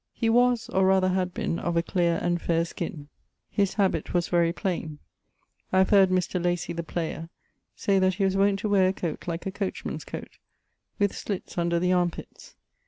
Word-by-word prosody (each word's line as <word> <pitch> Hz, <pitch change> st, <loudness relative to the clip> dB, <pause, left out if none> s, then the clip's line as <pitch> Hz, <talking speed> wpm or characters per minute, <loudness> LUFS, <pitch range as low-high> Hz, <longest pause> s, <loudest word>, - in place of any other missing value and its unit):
He 225 Hz, -, 0 dB
was 245 Hz, 0 st, +3 dB
(or 190 Hz, 0 st, +2 dB
rather 190 Hz, -1 st, +4 dB
had 185 Hz, -1 st, 0 dB
been) 170 Hz, -, -2 dB
of 170 Hz, -1 st, -1 dB
a 170 Hz, -, +2 dB
clear 170 Hz, -1 st, +1 dB
and 175 Hz, -1 st, 0 dB
faire 170 Hz, 0 st, +1 dB
skin; 160 Hz, -3 st, -6 dB, 0.4 s
his 200 Hz, -2 st, +1 dB
habit 190 Hz, -5 st, 0 dB
was 175 Hz, -1 st, +1 dB
very 170 Hz, -1 st, +3 dB
plaine. 170 Hz, -5 st, -3 dB, 0.7 s
I 185 Hz, -, +2 dB
have 190 Hz, +2 st, +4 dB
heard 195 Hz, -2 st, +6 dB
Mr. 185 Hz, -1 st, 0 dB
Lacy, 175 Hz, -1 st, -1 dB
the 170 Hz, -, -3 dB
player, 165 Hz, -1 st, -4 dB, 0.5 s
say 195 Hz, -1 st, +2 dB
that 185 Hz, -1 st, +2 dB
he 200 Hz, -, -1 dB
was 190 Hz, 0 st, +1 dB
wont 195 Hz, 0 st, +3 dB
to 215 Hz, -, -1 dB
weare 195 Hz, -2 st, +4 dB
a 185 Hz, -, +1 dB
coate 170 Hz, -4 st, -5 dB
like 170 Hz, 0 st, -4 dB
a 195 Hz, -, -2 dB
coach 195 Hz, -1 st, -4 dB
man's -, -, -4 dB
coate, -, -, -9 dB, 0.6 s
with 205 Hz, -1 st, +1 dB
slitts 200 Hz, -3 st, -5 dB
under 170 Hz, 0 st, +1 dB
the 180 Hz, +1 st, +2 dB
arme 175 Hz, -1 st, +3 dB
pitts. -, -, -12 dB
180 Hz, 205 wpm, -26 LUFS, 170-195 Hz, 0.7 s, heard